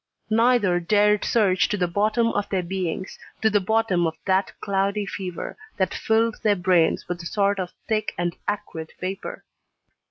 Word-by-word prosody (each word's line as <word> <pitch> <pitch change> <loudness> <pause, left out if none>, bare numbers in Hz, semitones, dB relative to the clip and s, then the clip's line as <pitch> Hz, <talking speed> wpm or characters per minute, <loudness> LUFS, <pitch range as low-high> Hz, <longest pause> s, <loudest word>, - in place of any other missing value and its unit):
Neither 225 -5 +3
dared 210 +3 +3
search 195 -5 +2
to 205 - 0
the 180 -2 +1
bottom 215 +6 +1
of 205 -2 -2
their 190 -2 0
beings, 185 0 -4 0.2
to 220 - +4
the 205 - +4
bottom 200 -4 +1
of 160 - -4
that 190 0 +2
cloudy 200 +1 0
fever 185 -3 -5 0.2
that 190 -2 0
filled 225 0 +1
their 210 -2 +3
brains 180 -3 +2
with 175 0 -4
a 170 - -5
sort 200 0 +1
of 180 -1 -3 0.2
thick 215 -1 0
and 175 -1 -1
acrid 165 -6 -4
vapour. 185 +1 -5
195 Hz, 165 wpm, -24 LUFS, 180-210 Hz, 0.2 s, to